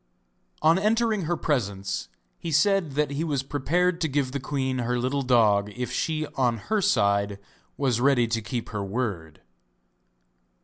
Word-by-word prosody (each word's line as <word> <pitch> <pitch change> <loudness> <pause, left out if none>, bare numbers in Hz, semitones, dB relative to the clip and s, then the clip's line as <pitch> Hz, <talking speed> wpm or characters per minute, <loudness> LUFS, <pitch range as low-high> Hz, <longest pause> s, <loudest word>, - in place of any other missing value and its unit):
On 165 +3 +5
entering 215 -2 +1
her 175 +2 0
presence 100 -11 -2 0.3
he 165 - -4
said 175 0 +2
that 150 0 0
he 145 +3 -2
was 145 -5 -1
prepared 170 +6 0
to 160 - +2
give 140 -2 -1
the 140 - -3
queen 130 -1 -2
her 125 +1 0
little 130 +3 0
dog 110 -5 +3
if 125 -1 -4
she 155 -1 -1
on 120 -3 +1
her 215 - -1
side 100 - +2 0.4
was 125 -4 +1
ready 130 -3 +4
to 115 0 -1
keep 115 +2 -4
her 105 -2 -3
word. 95 -7 -4
130 Hz, 160 wpm, -26 LUFS, 115-160 Hz, 0.4 s, On